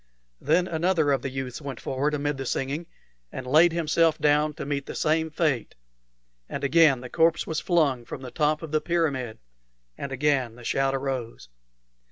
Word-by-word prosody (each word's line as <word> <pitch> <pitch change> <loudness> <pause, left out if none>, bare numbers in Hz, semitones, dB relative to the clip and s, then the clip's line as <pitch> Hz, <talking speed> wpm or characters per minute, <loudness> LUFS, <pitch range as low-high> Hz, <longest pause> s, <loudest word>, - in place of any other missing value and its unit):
Then 175 +6 +2
another 165 -3 +1
of 135 -3 +1
the 135 - -3
youths 130 0 -5
went 140 -4 -6
forward 145 +3 -1
amid 145 0 -2
the 135 - -5
singing, 140 +7 -2 0.4
and 130 - -6
laid 155 +6 +5
himself 165 -1 +2
down 150 0 +2
to - - -6
meet 140 -1 -3
the - - -6
same 160 +1 +1
fate; 150 -7 -1 0.7
and - - -5
again 145 -3 +4
the 125 - -7
corpse 165 +3 +2
was 160 -1 -2
flung 150 -9 +1
from 130 - -8
the 125 - -7
top 155 0 0
of 160 - -7
the 155 -1 +1
pyramid, 140 -9 -1 0.6
and 140 - -5
again 135 -4 0
the 120 - -13
shout 135 +3 +1
arose. 130 - -4
145 Hz, 180 wpm, -26 LUFS, 135-160 Hz, 0.7 s, laid